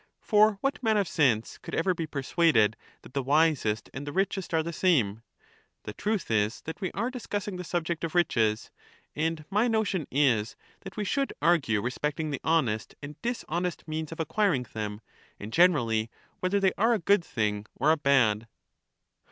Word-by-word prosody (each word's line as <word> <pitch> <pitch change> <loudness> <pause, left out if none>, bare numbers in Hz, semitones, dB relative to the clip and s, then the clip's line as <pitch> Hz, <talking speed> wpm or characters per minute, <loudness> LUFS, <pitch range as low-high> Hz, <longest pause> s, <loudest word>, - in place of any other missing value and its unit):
For 215 -1 +4
what 275 0 -1
man 220 -3 +2
of 200 -3 +1
sense 125 -10 +1
could - - -6
ever 185 +3 +2
be 165 -2 -4
persuaded 140 -6 +2 0.3
that - - -14
the 140 - 0
wisest 140 -6 +2
and 140 +2 -6
the - - -3
richest 190 +1 -1
are 160 -1 +2
the 170 +1 -5
same? 120 - +2 0.6
The 105 - -6
truth 205 - -2
is 105 0 +1
that 160 +5 -8
we 185 - -2
are 235 +5 -2
discussing 205 -6 -4
the 180 - -5
subject 170 -1 -2
of 165 +1 -3
riches, 110 -11 +1 0.4
and 160 0 -2
my 210 +5 +3
notion 215 - 0
is 120 -6 +2 0.2
that 190 +1 -11
we 210 - -1
should 275 +7 -1
argue 135 -12 +2
respecting 150 +5 -2
the 140 - -4
honest 130 -10 0
and 145 +1 -9
dishonest 180 -8 -3
means 155 0 -4
of 165 - -8
acquiring 160 - +1
them, 105 -1 -4 0.4
and, 105 +2 -8
generally, 120 -11 +3 0.3
whether 185 +2 +1
they 190 -2 +2
are 230 +3 +4
a - - +1
good 200 0 +3
thing 105 -6 -2
or 150 +5 +3
a - - +5
bad. 120 -7 +2
160 Hz, 175 wpm, -28 LUFS, 120-190 Hz, 0.6 s, a